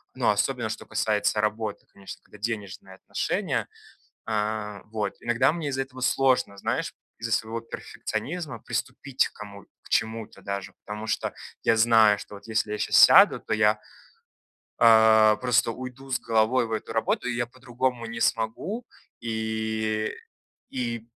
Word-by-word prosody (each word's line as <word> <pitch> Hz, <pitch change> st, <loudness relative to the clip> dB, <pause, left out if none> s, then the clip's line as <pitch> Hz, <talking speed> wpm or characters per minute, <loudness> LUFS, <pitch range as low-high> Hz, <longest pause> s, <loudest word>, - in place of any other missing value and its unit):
но -, -, +3 dB
особенно, 115 Hz, +2 st, 0 dB
что 110 Hz, -, -6 dB
касается 105 Hz, -1 st, 0 dB
работы, 105 Hz, 0 st, -2 dB
конечно, 95 Hz, -, -10 dB
когда -, -, -16 dB
денежные 100 Hz, -3 st, -5 dB
отношения. -, -, -2 dB, 0.6 s
А, 105 Hz, -1 st, -2 dB
вот, 110 Hz, -1 st, -3 dB
иногда 120 Hz, +4 st, +2 dB
мне 165 Hz, -3 st, -3 dB
из-за 135 Hz, -1 st, -1 dB
этого 130 Hz, -1 st, -10 dB
сложно, 130 Hz, -5 st, +2 dB
знаешь, -, -, -2 dB, 0.3 s
из-за 115 Hz, 0 st, -3 dB
своего 115 Hz, +1 st, -1 dB
перфекционизма 140 Hz, +3 st, -5 dB
приступить 130 Hz, +4 st, -1 dB
к -, -, -24 dB
кому 100 Hz, -1 st, -10 dB, 0.2 s
к -, -, -16 dB
чему-то 110 Hz, 0 st, -1 dB
даже, 100 Hz, -1 st, -4 dB
потому 105 Hz, +1 st, -6 dB
что -, -, -1 dB, 0.3 s
я -, -, +4 dB
знаю, 110 Hz, -2 st, +6 dB
что 105 Hz, -, -10 dB
вот 100 Hz, -, -14 dB
если 110 Hz, -1 st, 0 dB
я 105 Hz, -, -2 dB
щас -, -, -2 dB
сяду, -, -, +8 dB
то 110 Hz, -, -2 dB
я 110 Hz, 0 st, +4 dB, 1.0 s
а, 110 Hz, -1 st, +7 dB
просто 120 Hz, -1 st, +2 dB
уйду 130 Hz, +2 st, -9 dB
с 130 Hz, -, 0 dB
головой 115 Hz, +2 st, +2 dB
в 115 Hz, -, -7 dB
эту 110 Hz, 0 st, -3 dB
работу, 115 Hz, +2 st, 0 dB
и 120 Hz, -, -1 dB
я 120 Hz, 0 st, -1 dB
по-другому 125 Hz, -1 st, -3 dB
не 115 Hz, 0 st, -6 dB
смогу. 155 Hz, -, -1 dB, 0.3 s
И 110 Hz, -1 st, -2 dB, 0.6 s
и, 120 Hz, -3 st, -3 dB
110 Hz, 150 wpm, -26 LUFS, 110-125 Hz, 1.0 s, сяду